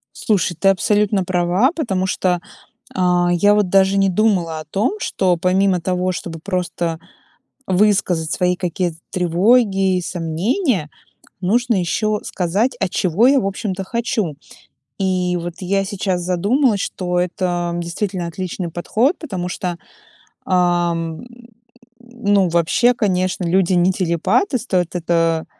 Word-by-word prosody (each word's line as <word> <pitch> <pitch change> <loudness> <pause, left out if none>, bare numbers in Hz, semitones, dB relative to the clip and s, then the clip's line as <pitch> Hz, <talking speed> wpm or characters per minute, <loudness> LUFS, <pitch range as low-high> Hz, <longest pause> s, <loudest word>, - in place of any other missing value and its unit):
Слушай, 190 -4 0
ты 195 - +4
абсолютно 205 +1 +2
права, 180 - +1
потому 195 - -1
что, 180 -1 0 0.6
а, 180 -1 +2
я 205 +4 +4
вот 210 -2 +2
даже 195 +1 +3
не 195 0 +3
думала 180 -5 +1
о - - -9
том, 195 - -1
что 185 - +1
помимо 185 +1 +2
того, 180 +1 -1
чтобы 170 -2 -6
просто 175 -3 -2 0.7
высказать 185 -4 +1
свои 180 0 +1
какие-то 175 -2 -2
тревоги 195 +2 +2
и - - -2
сомнения, 180 - -1 0.5
нужно 235 +5 +1
ещё 210 +4 0
сказать, 195 +8 -1
а 195 - 0
чего 190 +6 +2
я, 275 +1 +5
в - - -2
общем-то, 195 -1 -3
хочу. 220 - -2 0.6
И 185 -2 0
вот 175 0 -5
я 195 +1 0
сейчас 190 -2 -2
задумалась, 205 +7 +1
что 180 -2 -2
это 175 -1 -1
действительно 175 +1 -3
отличный 180 0 -5
подход, 225 - 0
потому 185 - -4
что, 180 -1 -3 0.7
ам, 175 -3 0 0.8
ну, 205 -6 0
вообще, 170 +9 +3
конечно, 185 -4 -1
люди 185 +1 +2
не 180 +1 +3
телепаты, 185 - +1
стоит 180 -7 -1
это, 165 -1 +1
185 Hz, 130 wpm, -19 LUFS, 175-205 Hz, 0.8 s, я